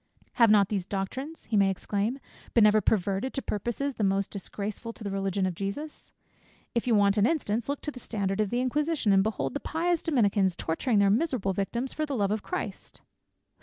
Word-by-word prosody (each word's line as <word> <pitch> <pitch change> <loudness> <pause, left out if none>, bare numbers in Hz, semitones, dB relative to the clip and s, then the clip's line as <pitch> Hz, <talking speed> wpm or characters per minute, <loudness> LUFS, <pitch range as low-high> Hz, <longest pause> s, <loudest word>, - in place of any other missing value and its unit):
"Have 230 -3 +5
not 205 -2 +5
these 195 -4 -2
doctrines," 260 +11 -4
he 225 - -3
may 200 -1 +5
exclaim, 205 +5 -1 0.4
"been 230 -3 +7
ever 210 0 +5
perverted 200 +5 0
to 270 - -1
purposes 240 +7 -2
the 220 - -3
most 195 0 +1
disgraceful 210 +3 -5
to 225 - -11
the 200 - -3
Religion 195 -1 0
of 185 - -1
Jesus? 200 - -5 0.6
If 235 +1 -1
you 235 - +4
want 200 0 +4
an 205 +2 +4
instance, 240 -7 -1
look 285 - -2
to 300 - -3
the 250 - -10
standard 200 -3 -2
of 210 - 0
the 240 +3 0
inquisition, 290 -3 +1
and 195 - +5
behold 140 - -1
the - - -2
pious 340 +1 0
Dominicans 205 - +2
torturing 210 +10 0
their 200 -1 +5
miserable 235 -6 +1
victims 235 +7 -2
for 310 0 -2
the 280 - -2
Love 200 -4 +1
of 215 0 -1
Christ. 365 - -6
210 Hz, 205 wpm, -28 LUFS, 195-255 Hz, 0.6 s, been